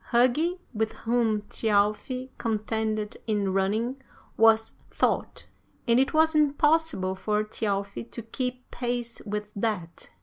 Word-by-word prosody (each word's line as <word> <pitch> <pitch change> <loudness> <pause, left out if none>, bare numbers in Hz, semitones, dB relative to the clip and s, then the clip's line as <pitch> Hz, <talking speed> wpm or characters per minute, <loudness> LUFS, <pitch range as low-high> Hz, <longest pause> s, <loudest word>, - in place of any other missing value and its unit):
Hugi, 255 +9 +3
with 220 0 -1
whom 225 -3 0
Thjalfi 215 +5 0
contended 215 -1 -1
in 205 -3 0
running, 220 +7 0 0.3
was 225 0 +4 0.2
Thought, - - -1 0.4
and 235 +1 +5
it 270 - +2
was 315 +1 +4
impossible 295 - +2
for 210 +3 0
Thjalfi 200 0 -3
to 235 - -7
keep 250 +2 -4
pace 240 -1 -3
with 210 0 -3
that. 200 -6 -3
225 Hz, 115 wpm, -27 LUFS, 210-250 Hz, 0.4 s, and